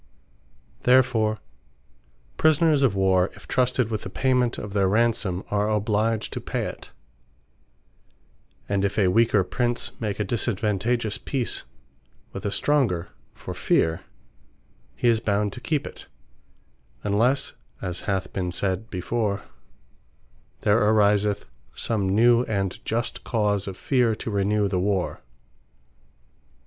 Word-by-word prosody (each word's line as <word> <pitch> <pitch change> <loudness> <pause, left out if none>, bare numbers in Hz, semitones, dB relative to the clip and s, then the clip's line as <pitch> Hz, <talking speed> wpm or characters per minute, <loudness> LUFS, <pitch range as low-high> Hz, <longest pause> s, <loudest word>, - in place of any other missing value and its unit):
Therefore 120 -4 +3 1.0
Prisoners 155 -1 +3
of 125 -8 +3
warre, 95 -1 +3
if - - -15
trusted 125 -2 +1
with 110 -2 -2
the - - -7
payment 125 +2 +1
of 105 -1 -6
their 100 -2 +2
Ransome, 105 -3 +1
are 105 +1 +1
obliged 110 +1 0
to - - -4
pay - - -2
it; - - -7 1.8
And 100 -1 0
if 100 - -1
a 95 -4 +4
weaker 110 -1 +3
Prince, 120 +5 -1
make 105 -3 -3
a - - +2
disadvantageous 110 +1 0
peace 130 -4 -2 0.7
with - - -4
a - - -1
stronger, 100 - +1 0.3
for - - -7
feare; 80 0 +1 0.9
he - - 0
is 115 -2 +4
bound 105 -2 0
to 125 - -9
keep 150 0 -1
it; - - -8 1.0
unlesse 120 +7 +1 0.3
(as 90 -2 -4
hath 95 -2 -2
been 90 -2 -2
sayd 95 +4 -2
before) 100 +2 -2 1.2
there 105 +1 +3
ariseth 105 -1 +3 0.3
some 100 -4 -1
new, 120 +4 +5
and 100 -4 -2
just 115 +2 -2
cause 105 -4 0
of 95 -1 -6
feare, 125 -5 +2
to 110 - -5
renew 100 +1 +1
the 95 -2 -1
war. 95 -1 -1
105 Hz, 125 wpm, -25 LUFS, 100-120 Hz, 1.8 s, new